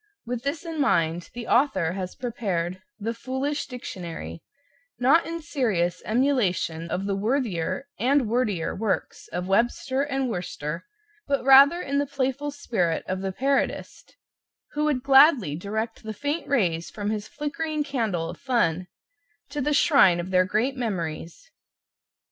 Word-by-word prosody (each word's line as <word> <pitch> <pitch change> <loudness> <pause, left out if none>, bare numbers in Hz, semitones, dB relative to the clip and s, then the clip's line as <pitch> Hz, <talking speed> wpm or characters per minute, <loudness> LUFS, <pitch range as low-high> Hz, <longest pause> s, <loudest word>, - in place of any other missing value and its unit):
With 240 0 -3
this 285 +6 -3
in 325 -2 -3
mind, 170 - +1
the 240 -1 -5
author 195 - +2
has 185 -1 -5
prepared 185 -7 -3 0.2
"The 225 +2 -2
Foolish 265 +5 -3
Dictionary," 170 - -7 0.6
not 270 +7 +4
in 335 0 -5
serious 210 - 0
emulation 215 - +1
of 190 +3 -2
the 200 -1 0
worthier 220 -1 -1
and 275 +3 +3
wordier 215 -7 0
works 210 0 -2
of 180 +1 -4
Webster 240 +6 +1
and 270 -2 -1
Worcester, 170 -6 -4 0.4
but 280 -2 0
rather 275 +5 +8
in 280 +1 0
the 285 - 0
playful 275 +1 -2
spirit 195 - -1
of 185 0 -2
the 195 0 -2
parodist, 275 +7 -2 0.6
who 300 +1 -1
would 280 -5 0
gladly 270 - +6
direct 220 +6 -4
the 220 0 -6
faint 290 +7 -2
rays 175 -12 +1
from 205 0 -3
his 210 -1 -3
flickering 305 +1 -3
candle 225 - -1
of 170 +1 -8
fun 185 -9 0 0.6
to 290 0 -3
the 295 +3 0
shrine 275 - +5
of 175 +2 -5
their 185 0 +4
great 220 +8 0
memories. 185 - -4
235 Hz, 145 wpm, -25 LUFS, 185-280 Hz, 0.6 s, rather